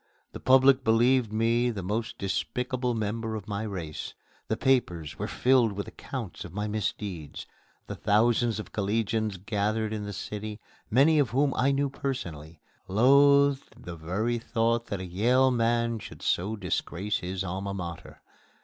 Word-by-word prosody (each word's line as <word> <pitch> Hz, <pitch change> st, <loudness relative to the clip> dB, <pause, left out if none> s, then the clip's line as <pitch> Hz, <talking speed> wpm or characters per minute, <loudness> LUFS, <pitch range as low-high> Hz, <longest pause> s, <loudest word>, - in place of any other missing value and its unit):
The -, -, -8 dB
public 130 Hz, 0 st, +5 dB
believed 120 Hz, +1 st, +3 dB
me 115 Hz, +2 st, +2 dB
the 105 Hz, -5 st, -4 dB
most 110 Hz, +5 st, -3 dB
despicable 125 Hz, +5 st, -2 dB
member 110 Hz, +1 st, -2 dB
of 105 Hz, -3 st, -7 dB
my 100 Hz, 0 st, -3 dB
race. 90 Hz, -8 st, -5 dB, 0.3 s
The -, -, -1 dB
papers 90 Hz, -, 0 dB
were -, -, -2 dB
filled 125 Hz, -4 st, +3 dB
with 100 Hz, +1 st, -5 dB
accounts 120 Hz, -9 st, -7 dB
of 90 Hz, -, -9 dB
my 105 Hz, 0 st, -2 dB
misdeeds. 100 Hz, -6 st, -4 dB, 0.4 s
The -, -, -6 dB
thousands 110 Hz, +2 st, +2 dB
of 110 Hz, -, -8 dB
collegians 110 Hz, 0 st, -1 dB
gathered 105 Hz, +2 st, -1 dB
in 105 Hz, -1 st, -4 dB
the 100 Hz, -, -5 dB
city, 105 Hz, +2 st, -6 dB, 0.3 s
many 145 Hz, +7 st, +5 dB
of 140 Hz, -5 st, +2 dB
whom 135 Hz, +2 st, +2 dB
I 135 Hz, +2 st, +2 dB
knew 140 Hz, 0 st, 0 dB
personally, 85 Hz, -, -5 dB, 0.3 s
loathed 140 Hz, +6 st, +4 dB
the 85 Hz, -, -7 dB
very 100 Hz, +9 st, -1 dB
thought 115 Hz, 0 st, 0 dB
that 100 Hz, -2 st, -4 dB
a -, -, -5 dB
Yale 120 Hz, +9 st, +3 dB
man 115 Hz, -1 st, +1 dB
should -, -, -11 dB
so 100 Hz, +5 st, 0 dB
disgrace 100 Hz, -1 st, -2 dB
his 90 Hz, +1 st, -3 dB
Alma 95 Hz, +2 st, -4 dB
Mater. 85 Hz, -3 st, -7 dB
110 Hz, 155 wpm, -28 LUFS, 100-125 Hz, 0.4 s, public